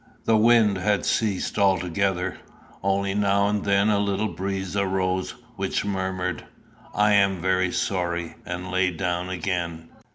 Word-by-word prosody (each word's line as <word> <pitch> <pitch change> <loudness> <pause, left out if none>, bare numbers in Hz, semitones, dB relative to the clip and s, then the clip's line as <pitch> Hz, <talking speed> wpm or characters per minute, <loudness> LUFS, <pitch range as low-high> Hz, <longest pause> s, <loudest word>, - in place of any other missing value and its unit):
The 115 - +4
wind 110 -3 +4
had 105 +1 +1
ceased 105 -1 0
altogether, 95 -1 +1 0.4
only 95 0 0
now 100 0 +2
and 105 -1 -1
then 100 +1 +3
a 100 - +2
little 100 +1 0
breeze 95 +1 -4
arose 95 -1 -1 0.2
which - - -1
murmured 95 -2 -2 0.5
"I 105 0 +4
am 100 -2 +3
very 95 0 +1
sorry," 85 -3 -2
and 90 +1 -5
lay 95 0 +2
down 90 +1 -2
again. 85 -2 -3
95 Hz, 135 wpm, -24 LUFS, 90-100 Hz, 0.5 s, The